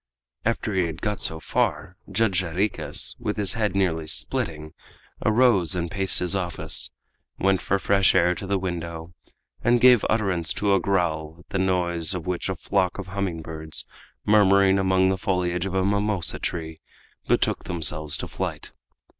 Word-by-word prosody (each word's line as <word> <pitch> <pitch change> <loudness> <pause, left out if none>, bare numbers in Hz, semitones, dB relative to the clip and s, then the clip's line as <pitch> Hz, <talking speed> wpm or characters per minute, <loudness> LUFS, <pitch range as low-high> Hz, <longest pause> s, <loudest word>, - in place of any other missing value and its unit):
After 110 -1 -1
he 95 -3 +1
had 80 -1 -7
got 105 -2 -1
so 80 - -1
far, - - -1 0.2
Judge 100 -4 +1
Jarriquez, 95 +4 -1
with - - -3
his 100 -3 0
head 105 -4 -1
nearly 80 -5 0
splitting, 75 +3 -2 0.5
arose 110 -6 +3
and 85 -1 -3
paced 95 -1 +3
his 90 +2 +1
office, 90 -9 +1 0.5
went 95 0 +1
for 100 - 0
fresh 100 0 +2
air 90 +1 +4
to 95 - -7
the 100 0 +1
window, 85 -2 -5 0.5
and 120 +1 +3
gave 125 -2 +6
utterance 95 -7 0
to 100 -1 +1
a 95 - +4
growl, 85 -5 -1
at - - -25
the 95 - -2
noise 90 -2 +1
of 85 - -5
which 90 +1 -2
a 95 - -1
flock 90 +1 -1
of 95 -2 -7
hummingbirds, 80 -5 -3 0.4
murmuring 100 -2 +4
among 95 0 +3
the 95 0 -1
foliage 90 -1 -1
of 95 - -5
a 95 0 +1
mimosa 100 -2 0
tree, 80 -1 -5 0.5
betook - - +1
themselves 75 -3 +1
to - - -5
flight. - - -5
95 Hz, 165 wpm, -24 LUFS, 85-100 Hz, 0.5 s, gave